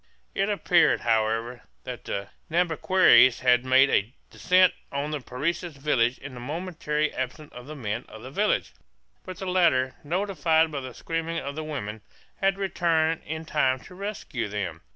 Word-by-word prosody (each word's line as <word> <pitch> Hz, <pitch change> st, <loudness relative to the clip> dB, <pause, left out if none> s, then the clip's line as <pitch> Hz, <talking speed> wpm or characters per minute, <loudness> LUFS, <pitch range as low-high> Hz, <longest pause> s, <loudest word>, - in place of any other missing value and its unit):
It 195 Hz, +2 st, 0 dB
appeared, 175 Hz, -5 st, +3 dB
however, 115 Hz, +1 st, 0 dB, 0.2 s
that -, -, -7 dB
the 100 Hz, 0 st, -4 dB, 0.2 s
Nhambiquaras 165 Hz, -6 st, +4 dB
had 125 Hz, -1 st, +4 dB
made 130 Hz, +1 st, +5 dB
a 105 Hz, +4 st, +1 dB, 0.2 s
descent 185 Hz, 0 st, +4 dB, 0.2 s
on 140 Hz, +2 st, -3 dB
the 150 Hz, -, -2 dB
Parecis 150 Hz, +6 st, -3 dB
village 130 Hz, -4 st, +1 dB
in 145 Hz, -1 st, -9 dB
the 125 Hz, -, -8 dB
momentary 155 Hz, +1 st, -2 dB
absence 130 Hz, +4 st, -5 dB
of 125 Hz, +1 st, -10 dB
the 155 Hz, -, -7 dB
men 115 Hz, -3 st, -4 dB
of 110 Hz, -, -11 dB
the 130 Hz, -, -8 dB
village; 210 Hz, +8 st, 0 dB, 0.5 s
but 185 Hz, -1 st, -8 dB
the 190 Hz, -, -6 dB
latter, 170 Hz, -9 st, +2 dB
notified 165 Hz, -2 st, +1 dB
by 145 Hz, -, -3 dB
the 130 Hz, -2 st, -8 dB
screaming 165 Hz, 0 st, -3 dB
of 140 Hz, +1 st, -4 dB
the 155 Hz, -, -4 dB
women, 110 Hz, -9 st, -5 dB, 0.4 s
had 195 Hz, 0 st, +1 dB
returned 165 Hz, -4 st, +1 dB
in 160 Hz, +1 st, -5 dB
time 135 Hz, -5 st, +1 dB
to 185 Hz, -, -14 dB
rescue 195 Hz, -, -4 dB
them. 95 Hz, -6 st, -4 dB
150 Hz, 165 wpm, -26 LUFS, 125-170 Hz, 0.5 s, made